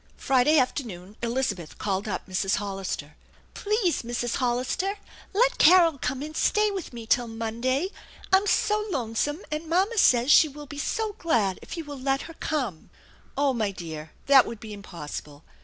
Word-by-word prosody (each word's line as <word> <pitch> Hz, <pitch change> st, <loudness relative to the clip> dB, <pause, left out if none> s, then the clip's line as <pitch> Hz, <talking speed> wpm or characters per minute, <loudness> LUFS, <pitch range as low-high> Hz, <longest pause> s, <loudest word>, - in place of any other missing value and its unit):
Friday 270 Hz, +4 st, +3 dB
afternoon 215 Hz, -8 st, -2 dB
Elizabeth 230 Hz, -, -2 dB
called 195 Hz, 0 st, -2 dB
up 205 Hz, -, -3 dB
Mrs. 190 Hz, +1 st, 0 dB
Hollister. 195 Hz, -7 st, -4 dB, 0.2 s
" -, -, -31 dB
Please, 415 Hz, -4 st, 0 dB
Mrs. 240 Hz, 0 st, -2 dB
Hollister, 255 Hz, +11 st, -1 dB, 0.3 s
let -, -, +2 dB
Carol 335 Hz, -3 st, +6 dB
come 265 Hz, +2 st, -2 dB
and 310 Hz, +1 st, -7 dB
stay 425 Hz, +4 st, +2 dB
with 385 Hz, -3 st, -5 dB
me 235 Hz, -2 st, -8 dB
till 240 Hz, +1 st, +2 dB
Monday. 235 Hz, +8 st, -1 dB, 0.4 s
I'm 385 Hz, +2 st, +5 dB
so 425 Hz, +1 st, +2 dB
lonesome, 280 Hz, -, -1 dB
and 310 Hz, +1 st, -4 dB
mamma 390 Hz, +6 st, +2 dB
says 250 Hz, -4 st, +5 dB
she 310 Hz, -, +8 dB
will 295 Hz, 0 st, -10 dB
be 285 Hz, +1 st, -8 dB
so 435 Hz, +7 st, -1 dB
glad 215 Hz, -, +1 dB
if -, -, -8 dB
you 330 Hz, -, -5 dB
will 290 Hz, -2 st, -8 dB
let 270 Hz, +1 st, 0 dB
her 330 Hz, -, -9 dB
come/' 255 Hz, -, -3 dB, 0.3 s
" -, -, -29 dB
Oh, 280 Hz, -1 st, +2 dB
my 220 Hz, -4 st, 0 dB
dear, 160 Hz, -5 st, -7 dB, 0.2 s
that 270 Hz, -2 st, +7 dB
would 230 Hz, -, -6 dB
be 215 Hz, -1 st, -8 dB
impossible. 150 Hz, -6 st, -8 dB
255 Hz, 175 wpm, -26 LUFS, 210-320 Hz, 0.4 s, she